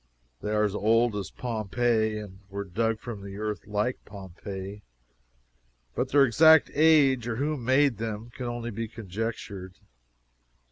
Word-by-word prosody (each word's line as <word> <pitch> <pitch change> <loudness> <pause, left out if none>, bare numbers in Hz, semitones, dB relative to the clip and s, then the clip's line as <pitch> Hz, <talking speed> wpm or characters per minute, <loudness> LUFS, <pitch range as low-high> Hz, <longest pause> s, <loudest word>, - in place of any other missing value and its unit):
They - - -3
are 105 0 +2
as 105 -2 0
old 115 +2 +2
as 100 -2 -4
Pompeii, 110 -1 -1 0.3
were 100 +1 -4
dug 110 +4 -1
from 115 -3 -7
the 100 0 -8
earth 105 -3 -4
like 105 +4 -1
Pompeii; 95 +1 -8 1.1
but 125 - -1
their 140 0 +6
exact 160 +5 +6
age 140 -6 +4
or 115 - -2
who 145 +5 -1
made 130 0 +2
them 110 +1 -5
can 125 +1 -6
only 120 0 -4
be 115 +2 -4
conjectured. 100 -3 -6
115 Hz, 140 wpm, -27 LUFS, 105-120 Hz, 1.1 s, their